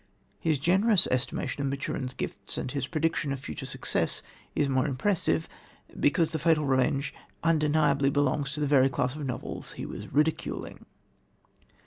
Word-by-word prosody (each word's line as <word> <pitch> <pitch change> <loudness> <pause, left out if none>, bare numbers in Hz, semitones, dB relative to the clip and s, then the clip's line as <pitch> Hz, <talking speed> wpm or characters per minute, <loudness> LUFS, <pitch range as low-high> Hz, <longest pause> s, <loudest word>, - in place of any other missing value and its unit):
His 155 -4 +1
generous 190 - +4
estimate 130 +2 -1
of 140 - 0
Maturin's 135 -1 -3
gifts - - -5
and 130 - -3
his 140 -3 -2
prediction 160 -2 0
of 135 - -2
future 75 - -6
success - - -1 0.3
is 145 - +3
the 135 - -1
more 130 +2 +2
impressive, 135 - +1 0.5
because 160 +3 +3
The 160 - -2
Fatal 155 -1 +3
Revenge 135 +1 +1 0.3
undeniably 150 -3 +3
belongs 140 0 +1
to 150 - -4
the - - +2
very 135 -2 +5
class 125 0 0
of 150 - -5
novels 125 0 -5
he - - -6
was - - -7
ridiculing. 155 +3 -1
145 Hz, 155 wpm, -28 LUFS, 130-155 Hz, 0.5 s, very